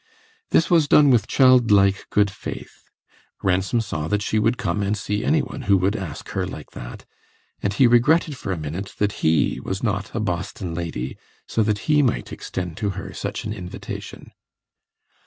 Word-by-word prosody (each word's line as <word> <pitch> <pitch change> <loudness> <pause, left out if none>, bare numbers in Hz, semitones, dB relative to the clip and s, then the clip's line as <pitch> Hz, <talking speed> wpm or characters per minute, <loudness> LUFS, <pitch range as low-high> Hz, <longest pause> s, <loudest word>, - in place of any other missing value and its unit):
This 165 - +3
was 165 -4 +5
done 145 -1 +6
with 115 -4 +3
childlike 110 -7 +4
good 105 -1 +2
faith. - - -9 0.5
Ransom 95 +5 +1
saw 80 -8 -4
that 105 +3 0
she 110 - 0
would 115 +3 +2
come 105 - -1
and 100 +1 0
see 105 +1 -2
any 155 +2 +2
one 135 +2 -7
who 100 - +6
would 95 +3 +1
ask 90 -8 -6
her - - -2
like - - -9
that, - - -9 0.6
and 100 - 0
he 100 +6 +4
regretted 145 +6 +4
for 105 - -5
a 95 - -1
minute 80 +6 -5
that 105 0 +1
he 80 0 +2
was 95 +3 -4
not 105 -1 -1
a - - 0
Boston 90 -3 -3
lady, 80 -7 -4 0.3
so 115 - 0
that 105 -1 0
he 150 -1 +5
might 125 -6 -1
extend 90 -3 -5
to 105 -2 -1
her - - -6
such - - -4
an 105 - -3
invitation. 90 -4 -8
105 Hz, 180 wpm, -23 LUFS, 95-120 Hz, 0.6 s, done